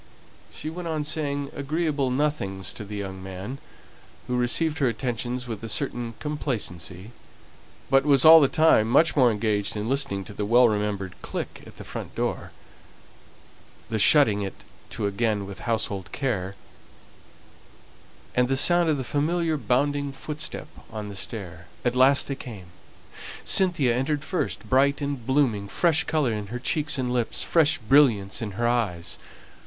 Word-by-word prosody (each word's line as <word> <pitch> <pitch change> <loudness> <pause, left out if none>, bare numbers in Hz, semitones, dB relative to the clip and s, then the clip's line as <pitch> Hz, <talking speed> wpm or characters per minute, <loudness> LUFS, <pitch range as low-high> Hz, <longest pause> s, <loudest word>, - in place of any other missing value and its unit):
She 155 - -6
went 175 +1 -6
on 155 -2 -2
saying 145 -2 -3
agreeable 145 -1 -1
nothings 125 -9 -2
to - - -8
the 105 +1 -8
young 95 -2 -6
man, 95 +8 -7 0.7
who 125 - -2
received 150 +6 +1
her 135 - +3
attentions 125 +1 -3
with 115 -2 -6
a 115 - -5
certain 120 -1 -2
complacency, 110 - -4 0.8
but 135 0 +4
was 140 -2 +4
all 160 0 +10
the 140 - +5
time 155 -8 +4
much 155 +5 +4
more 130 -4 +5
engaged 105 0 -1
in 105 +1 -3
listening 135 -7 0
to 105 - -10
the 105 - -4
well 120 +4 +5
remembered 105 -3 -2
click - - -6
at - - -15
the - - -9
front - - -8
door, - - -3 1.4
the 110 -1 -1
shutting 110 -3 +5
it 100 -1 -6 0.3
to - - -3
again 100 0 0
with 100 0 -8
household 100 -5 -2
care, 100 -9 -2 1.8
and 125 0 +2
the 135 +1 +1
sound 175 +3 +4
of 150 - +2
the 130 - -3
familiar 160 +5 0
bounding 140 +3 0
footstep 150 +3 -6 0.2
on 105 -1 -6
the 100 - -8
stair. 90 -6 -7 0.2
At 120 0 +1
last 135 +2 +4
they 140 - -2
came. 100 -10 -10 0.7
Cynthia 170 -11 +3
entered 140 +3 -1
first, 180 - -3
bright 140 +2 +3
and 140 -4 -3
blooming, 130 -8 +1
fresh 160 - +2
colour 150 -6 +1
in 105 -1 -4
her 120 +4 -5
cheeks 145 +5 0
and 125 -1 -1
lips, 120 -2 0
fresh 165 0 +3
brilliance 110 -6 +3
in 105 -3 -4
her 120 +4 0
eyes. 105 -9 -1
125 Hz, 160 wpm, -25 LUFS, 105-145 Hz, 1.8 s, all